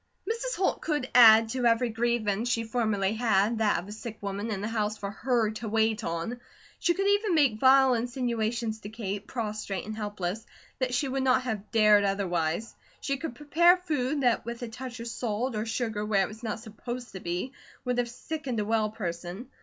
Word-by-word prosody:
Mrs. 465 Hz, +2 st, -2 dB
Holt 375 Hz, -, 0 dB
could 295 Hz, -5 st, -1 dB
add 225 Hz, -2 st, +8 dB
to 250 Hz, 0 st, +1 dB
every 230 Hz, +1 st, +3 dB
grievance 230 Hz, -1 st, 0 dB
she 230 Hz, -1 st, +1 dB
formerly 215 Hz, -4 st, 0 dB
had, 220 Hz, -1 st, +2 dB
that 215 Hz, -2 st, +3 dB
of 175 Hz, -, -5 dB
a -, -, -8 dB
sick 220 Hz, +1 st, -7 dB
woman 200 Hz, +2 st, -4 dB
in 200 Hz, -3 st, -3 dB
the 210 Hz, -, -2 dB
house 215 Hz, -1 st, -1 dB
for 200 Hz, -1 st, -5 dB
her 230 Hz, -1 st, 0 dB
to 220 Hz, 0 st, -5 dB
wait 220 Hz, 0 st, +1 dB
on. 170 Hz, +9 st, -3 dB, 0.4 s
She 345 Hz, -, +2 dB
could 390 Hz, -, -1 dB
even 405 Hz, -2 st, +2 dB
make 270 Hz, -9 st, +3 dB
vile 265 Hz, 0 st, +6 dB
insinuations 235 Hz, -2 st, -1 dB
to 205 Hz, -, -8 dB
Kate, 205 Hz, -2 st, -5 dB
prostrate 210 Hz, -5 st, -4 dB
and 215 Hz, +1 st, -5 dB
helpless, 205 Hz, -1 st, -4 dB, 0.4 s
that 255 Hz, -1 st, 0 dB
she 280 Hz, +3 st, +1 dB
would 270 Hz, +1 st, -1 dB
not 260 Hz, -1 st, +3 dB
have 215 Hz, -5 st, -4 dB
dared 210 Hz, -2 st, +5 dB
otherwise. 195 Hz, 0 st, -1 dB, 0.3 s
She 275 Hz, -1 st, -2 dB
could 280 Hz, -4 st, -5 dB
prepare 335 Hz, +6 st, +4 dB
food 295 Hz, -5 st, -1 dB
that 245 Hz, -3 st, +2 dB
with 235 Hz, +1 st, -6 dB
a -, -, -3 dB
touch 245 Hz, +1 st, -7 dB
of 230 Hz, -, -6 dB
salt 230 Hz, +1 st, -2 dB
or 215 Hz, +1 st, -2 dB
sugar 220 Hz, -2 st, -2 dB
where 205 Hz, -2 st, +2 dB
it -, -, -1 dB
was 215 Hz, +1 st, -11 dB
not 220 Hz, -2 st, -4 dB
supposed 240 Hz, +2 st, -7 dB
to 190 Hz, -, -7 dB
be, 175 Hz, +8 st, -3 dB, 0.3 s
would 250 Hz, 0 st, 0 dB
have 240 Hz, -1 st, 0 dB
sickened 260 Hz, -1 st, -4 dB
a 210 Hz, -, -1 dB
well 220 Hz, 0 st, +1 dB
person. 180 Hz, +2 st, -6 dB
225 Hz, 200 wpm, -28 LUFS, 210-250 Hz, 0.4 s, add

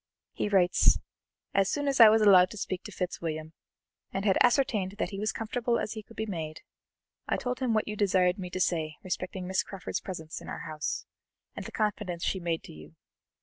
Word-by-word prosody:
He -, -, -1 dB
writes: 185 Hz, -3 st, +4 dB, 0.6 s
'As 195 Hz, -1 st, +3 dB
soon 290 Hz, -1 st, -1 dB
as 275 Hz, -2 st, +1 dB
I 225 Hz, -2 st, +11 dB
was 220 Hz, 0 st, +4 dB
allowed 185 Hz, -3 st, +7 dB
to 215 Hz, -, -9 dB
speak 185 Hz, -2 st, -3 dB
to 210 Hz, -, -7 dB
Fitzwilliam, 160 Hz, -4 st, -4 dB, 0.6 s
and 195 Hz, +1 st, -3 dB
had 195 Hz, -3 st, +4 dB
ascertained 235 Hz, -7 st, +3 dB
that -, -, -2 dB
he 195 Hz, -, -5 dB
was 215 Hz, +1 st, 0 dB
comfortable 235 Hz, +2 st, -1 dB
as -, -, -2 dB
he 220 Hz, -, -6 dB
could 225 Hz, +2 st, -18 dB
be 220 Hz, -, -1 dB
made, 160 Hz, -6 st, -5 dB, 0.7 s
I -, -, +1 dB
told 250 Hz, 0 st, -3 dB
him 250 Hz, -4 st, +1 dB
what 215 Hz, -, +1 dB
you 210 Hz, -, -3 dB
desired 185 Hz, -2 st, +2 dB
me 180 Hz, -1 st, -5 dB
to 185 Hz, -, -4 dB
say 160 Hz, -4 st, 0 dB
respecting 185 Hz, 0 st, -4 dB
Miss 190 Hz, +1 st, +1 dB
Crawford's 195 Hz, -4 st, -5 dB
presence 160 Hz, -4 st, -6 dB
in -, -, -9 dB
our -, -, -5 dB
house, 155 Hz, -1 st, -4 dB, 0.5 s
and -, -, -6 dB
the -, -, -9 dB
confidence 205 Hz, -5 st, -2 dB
she 190 Hz, -, 0 dB
made 170 Hz, -2 st, -2 dB
to -, -, -11 dB
you. 75 Hz, 0 st, -13 dB
190 Hz, 210 wpm, -29 LUFS, 175-215 Hz, 0.7 s, I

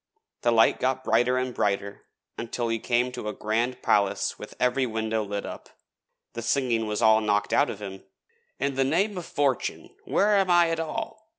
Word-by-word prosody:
The 120 Hz, -, +2 dB
light 115 Hz, -1 st, +4 dB
got 130 Hz, 0 st, 0 dB
brighter 120 Hz, +2 st, +2 dB
and 130 Hz, 0 st, -2 dB
brighter 100 Hz, -1 st, -2 dB, 0.3 s
until 115 Hz, 0 st, -3 dB
he 115 Hz, 0 st, -1 dB
came 120 Hz, +2 st, +1 dB
to 125 Hz, -4 st, -6 dB
a -, -, -4 dB
grand 115 Hz, +4 st, -2 dB
palace 100 Hz, -1 st, +1 dB
with -, -, -9 dB
every 125 Hz, +1 st, +2 dB
window 110 Hz, -1 st, -1 dB
lit 100 Hz, 0 st, -4 dB
up. -, -, -8 dB, 0.6 s
The 115 Hz, -, -5 dB
singing 115 Hz, -2 st, 0 dB
was 105 Hz, -1 st, -2 dB
all 110 Hz, 0 st, +6 dB
knocked 105 Hz, -1 st, 0 dB
out 145 Hz, -, +3 dB
of 105 Hz, 0 st, -7 dB
him. 95 Hz, -1 st, -8 dB, 0.6 s
'In 140 Hz, 0 st, 0 dB
the 135 Hz, 0 st, +1 dB
name 185 Hz, +10 st, +1 dB
of 170 Hz, -, -9 dB
Fortune 140 Hz, -3 st, -1 dB
where 205 Hz, 0 st, +3 dB
am 195 Hz, -1 st, +2 dB
I 175 Hz, -1 st, +5 dB
at 165 Hz, -, -1 dB
all? 220 Hz, +6 st, -5 dB
120 Hz, 190 wpm, -26 LUFS, 110-140 Hz, 0.6 s, all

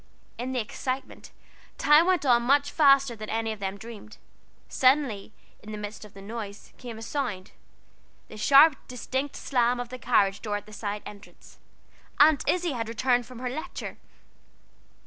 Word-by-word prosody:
In 250 Hz, +2 st, -3 dB
the 255 Hz, -, -1 dB
excitement, 255 Hz, +4 st, -5 dB, 0.5 s
time 300 Hz, +4 st, +5 dB
went 365 Hz, -5 st, +2 dB
on 240 Hz, -2 st, +5 dB
much 280 Hz, +4 st, +2 dB
faster 275 Hz, -5 st, +4 dB
than 215 Hz, -1 st, -8 dB
any 225 Hz, 0 st, -1 dB
of 215 Hz, -, -7 dB
them 195 Hz, 0 st, -4 dB
dreamed. 220 Hz, 0 st, -11 dB, 0.5 s
Suddenly, 255 Hz, -7 st, +2 dB, 0.3 s
in 215 Hz, -, -10 dB
the 215 Hz, -, -5 dB
midst 210 Hz, +1 st, -7 dB
of 210 Hz, -2 st, -14 dB
the 195 Hz, -, -11 dB
noise, 210 Hz, -1 st, -8 dB
came 240 Hz, -3 st, -8 dB
a 225 Hz, -, -8 dB
sound 225 Hz, -8 st, -4 dB, 0.8 s
the -, -, -12 dB
sharp 275 Hz, +6 st, +6 dB
distinct 260 Hz, +3 st, -4 dB
slam 245 Hz, -2 st, +1 dB
of 245 Hz, -1 st, -5 dB
the 255 Hz, 0 st, -8 dB
carryall 200 Hz, -6 st, +2 dB
door 210 Hz, -2 st, -3 dB
at 205 Hz, -, -10 dB
the 215 Hz, -, -14 dB
side 205 Hz, -1 st, -4 dB
entrance. 205 Hz, 0 st, -13 dB, 0.6 s
Aunt 295 Hz, -1 st, +5 dB
Izzie 355 Hz, -2 st, +1 dB
had 230 Hz, -4 st, -4 dB
returned 245 Hz, 0 st, +1 dB
from 255 Hz, -, -11 dB
her 250 Hz, +1 st, -4 dB
Lecture. 315 Hz, +6 st, -6 dB
240 Hz, 165 wpm, -27 LUFS, 215-275 Hz, 0.8 s, sharp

